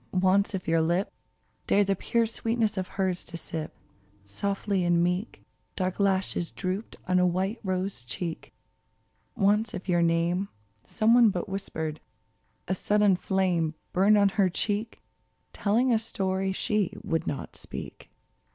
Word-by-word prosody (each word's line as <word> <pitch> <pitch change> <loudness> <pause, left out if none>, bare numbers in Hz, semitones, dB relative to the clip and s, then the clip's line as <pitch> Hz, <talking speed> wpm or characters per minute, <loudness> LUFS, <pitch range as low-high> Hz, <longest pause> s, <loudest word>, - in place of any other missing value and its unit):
Once 195 +2 +3
if 185 - -5
your 165 0 +3
lip 175 +5 0 0.5
Dared 205 0 +4
the 195 0 +1
pure 230 +5 +1
sweetness 225 -1 -1
of 185 -2 -2
hers 185 -2 -1
to 170 - -7
sip, 160 -1 -5 0.5
Softly 195 - -1
and 175 -1 +3
meek 180 +5 -2 0.3
Dark 185 0 -2
lashes 190 -3 +1
drooped 190 +3 -4
on 185 0 +3
a 180 - +4
white 190 +6 -1
rose 185 -7 -2
cheek! 165 +6 -5 0.8
Once 210 0 +2
if 185 - -7
your 175 -2 +3
name 170 +3 +1 0.3
Some 220 +1 +2
one 240 -2 +7
but 185 0 -3
whispered, 160 -6 -4 0.7
a 190 - +1
sudden 205 +1 +3
flame 180 -4 0 0.2
Burned 200 +3 +5
on 200 -1 +5
her 195 -1 +2
cheek. 210 +5 -2 0.5
Telling 235 +5 +2
a 225 - +3
story 190 -3 -1
she 205 0 -1
would 165 - -1
not 140 - -4
speak - - -8
190 Hz, 145 wpm, -27 LUFS, 175-205 Hz, 0.8 s, one